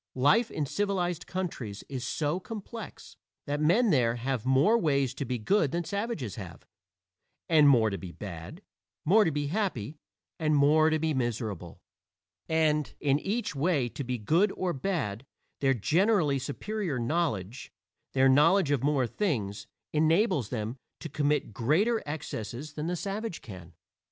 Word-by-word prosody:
Life 180 - +4
in 150 - -2
civilized 180 0 -1
countries 150 - -4
is 130 -3 -5
so 150 +6 -1
complex 220 +1 -9 0.3
that 145 +1 -2
men 195 +9 +4
there 120 -6 +3
have 125 0 -3
more 135 - +4
ways 140 - +1
to 140 - -4
be 125 0 -2
good 155 - +2
than 170 +2 -1
savages 200 - -3
have, 90 -6 -9 0.8
and 155 -3 +6
more 115 -5 +4
to 100 - -4
be 90 -2 -8
bad; 95 - -8 0.4
more 210 +7 +6
to 175 - +2
be 145 -1 -2
happy, 155 - -2 0.4
and 155 -2 +2
more 150 +2 +5
to 155 - +2
be 160 0 0
miserable. 110 - -3 0.7
And 155 -2 +2
in 140 0 +2
each 210 +1 -2
way 140 -4 +1
to 140 - -6
be 125 0 -2
good 165 - +2
or 180 -2 -2
bad, 135 - -2 0.4
their 135 -1 +2
generally 155 - +2
superior 170 +4 -3
knowledge 125 - -2 0.4
their 135 0 +4
knowledge 150 +5 +4
of 140 -4 +2
more 140 -2 +2
things 110 - -2 0.3
enables 155 - +2
them 115 +1 -4 0.2
to 160 - -6
commit 145 -4 0
greater 190 - +2
excesses 145 -2 -5
than 150 +2 -4
the 180 - -1
savage 200 +1 -4
can. 90 -5 -10
145 Hz, 150 wpm, -29 LUFS, 125-175 Hz, 0.8 s, and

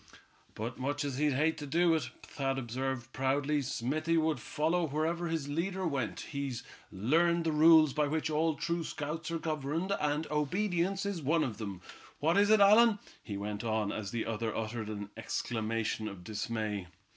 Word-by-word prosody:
"But, 115 +4 -5
much 145 +3 -1
as 135 -2 -3
he'd 150 -1 +3
hate 155 +5 +1
to 145 - -6
do 170 +3 +3
it," 160 - 0
Thad 135 -1 -2
observed, 130 +1 -3
proudly, 140 +2 +1
"Smithy 145 +6 0
would 160 -1 +1
follow 165 +3 0
wherever 160 +4 -1
his 160 -4 -2
leader 180 +6 -2
went. 130 - -2
He's 140 -4 -4 0.3
learned 165 - +2
the 165 - +1
rules 155 -1 +6
by 150 -1 +1
which 155 +2 -1
all 155 +1 +1
true 170 +3 -1
scouts 155 +2 -4
are 165 - -1
governed, 160 +3 -2
and 150 +1 0
obedience 180 +5 0
is 200 -4 -2
one 155 +3 +2
of 115 -4 -4
them. 100 -4 -5 0.4
What 160 +3 +2
is 205 +1 +4
it, 215 0 +6
Allan?" 215 +2 +7 0.2
he 100 -3 -5
went 105 +1 -4
on, 110 -2 0
as 105 -2 -4
the 115 +3 -2
other 115 0 -2
uttered 110 0 -3
an 105 -1 -6
exclamation 110 -1 -2
of 100 -4 -8
dismay. 105 -2 -3
145 Hz, 175 wpm, -32 LUFS, 115-165 Hz, 0.4 s, Allan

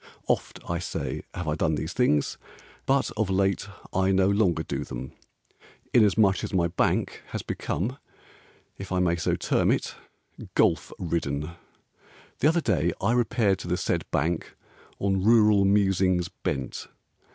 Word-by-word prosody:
Oft, - - -1
I 85 0 -1
say, 85 - -4
have 85 - -4
I 75 - +1
done 80 0 +1
these 80 +3 -4
things; 75 - +1 0.5
But 135 0 +2
of 110 -2 0
late 95 +1 +1 0.3
I 95 +1 +2
no 95 0 +3
longer 95 -6 +2
do - - -3
them, 65 - -7 0.8
Inasmuch 105 -3 +4
as - - -3
my 85 -2 +2
bank 90 - 0
Has - - -5
become 125 +10 -3 0.8
(if 95 -1 -7
I 95 - +1
may 90 -2 +2
so 85 - 0
term - - +1
it) - - 0 0.6
Golf - - +2
ridden. 75 -3 -2 0.9
The 145 - +4
other 165 +2 +3
day 85 - +1
I 100 - +1
repaired 115 -5 +2
to - - -7
the 90 +1 0
said - - -2
bank 80 +3 -1 0.4
On 95 -1 0
rural 105 -2 +5
musings 95 -3 +2
bent. 65 -1 -4
95 Hz, 150 wpm, -26 LUFS, 85-105 Hz, 0.9 s, rural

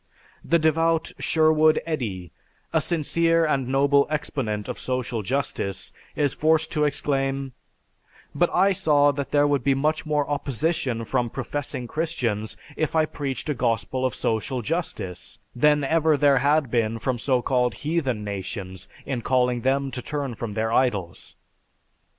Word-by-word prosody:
The 170 - +3
devout 165 +1 +2
Sherwood 155 -1 +4
Eddy, 105 - -3 0.4
a - - +3
sincere 165 0 +2
and 135 -5 0
noble 140 +1 +3
exponent 120 -8 -2
of - - -5
social 125 -3 -2
justice, 100 -4 -2 0.2
is 145 -3 +1
forced 160 +1 +2
to 150 -2 +1
exclaim; 135 -1 -1 0.8
"But 175 - +2
I 195 +2 +4
saw 145 -5 +3
that 140 -1 -4
there 145 0 +3
would 145 -3 +1
be 135 +1 +3
much 155 +3 0
more 150 -1 +1
opposition 135 -3 -1
from 125 0 0
professing 135 +1 -4
Christians 120 -9 -2 0.2
if 155 0 -1
I 160 -1 +4
preached 140 -3 -5
a 150 - +1
gospel 120 +1 -1
of 130 - 0
social 115 +3 -1
justice, 140 - -4 0.2
than 150 +3 +3
ever 160 +1 +3
there 140 -1 +4
had 145 -1 +2
been 115 -2 +1
from 125 +1 -2
so 125 -1 +1
called 125 -2 +1
'heathen' 145 -8 -1
nations 95 -2 -5 0.2
in 130 -3 -3
calling 125 -1 +1
them 135 +1 +1
to 125 - -5
turn 140 -1 -3
from 110 -2 -6
their 110 0 0
idols. 100 -10 -1
135 Hz, 150 wpm, -24 LUFS, 120-155 Hz, 0.8 s, Sherwood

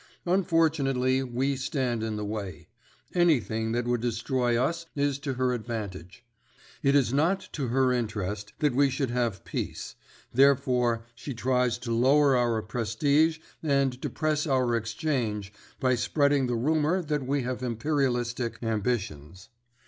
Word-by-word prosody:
Unfortunately 155 -8 +2
we 130 +2 -1
stand 130 -4 -1
in 110 -1 -2
the 105 0 -3
way; 100 -6 -5 0.5
anything 120 -10 +2
that 120 +1 -1
would 120 -1 0
destroy 120 +1 0
us 165 +6 -1
is 140 -1 0
to 140 -2 -3
her 125 0 +1
advantage. 110 -3 -6 0.6
It 140 0 +3
is 135 -3 +3
not 165 +7 +1
to 140 -4 -2
her 130 +1 +2
interest 105 -3 -3
that 150 -4 +2
we 140 +2 +4
should 135 -1 -2
have 115 -8 -1
peace; - - -4 0.4
therefore 125 -3 +3
she 120 +3 -7
tries 125 0 +1
to 120 - -6
lower 135 +4 +4
our 120 -3 +1
prestige 140 +9 +1 0.2
and 140 -4 +1
depress 155 0 -1
our 130 -4 +2
exchange 115 -3 -2 0.3
by 130 -1 +2
spreading 140 +2 +2
the 120 - -1
rumour 155 +8 +1
that 150 -4 -2
we 140 -1 0
have 125 +1 -3
imperialistic 120 -2 -1
ambitions. 105 - -3
125 Hz, 140 wpm, -27 LUFS, 115-140 Hz, 0.6 s, we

